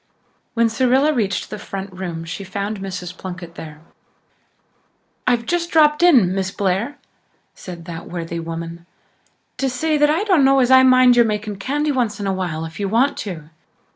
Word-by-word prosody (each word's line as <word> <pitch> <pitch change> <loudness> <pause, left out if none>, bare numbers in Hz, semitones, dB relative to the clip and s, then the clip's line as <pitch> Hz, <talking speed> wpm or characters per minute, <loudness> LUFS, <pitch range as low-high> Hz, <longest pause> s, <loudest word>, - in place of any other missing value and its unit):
When 230 0 +3
Cyrilla 260 +6 +2
reached 205 -7 -2
the - - -5
front 195 -1 -7
room 175 -3 -5
she 170 +4 -6
found 200 +2 -4
Mrs. 180 -2 -6
Plunkett 180 -3 -8
there. 155 -2 -10 1.5
"I've 240 -2 +2
just 340 +4 -1
dropped 300 -2 +4
in, 255 - +5
Miss 190 -1 -1
Blair," 200 +8 -1 0.6
said 175 -3 -10
that 165 -1 -8
worthy 170 -1 -5
woman, 165 +1 -7 0.7
"to 270 - 0
say 300 +4 0
that 295 0 +4
I 325 +6 +1
dunno 280 -10 +4
as 255 -1 +3
I 260 0 +8
mind 255 -1 +6
your 235 - +6
making 210 -1 -3
candy 290 +8 -1
once 235 -6 -1
in 200 - -3
a 195 - 0
while 170 -4 -3
if 165 +4 -10
you 200 -1 -1
want 245 +7 +2
to. 165 -7 -7
205 Hz, 170 wpm, -20 LUFS, 180-260 Hz, 1.5 s, I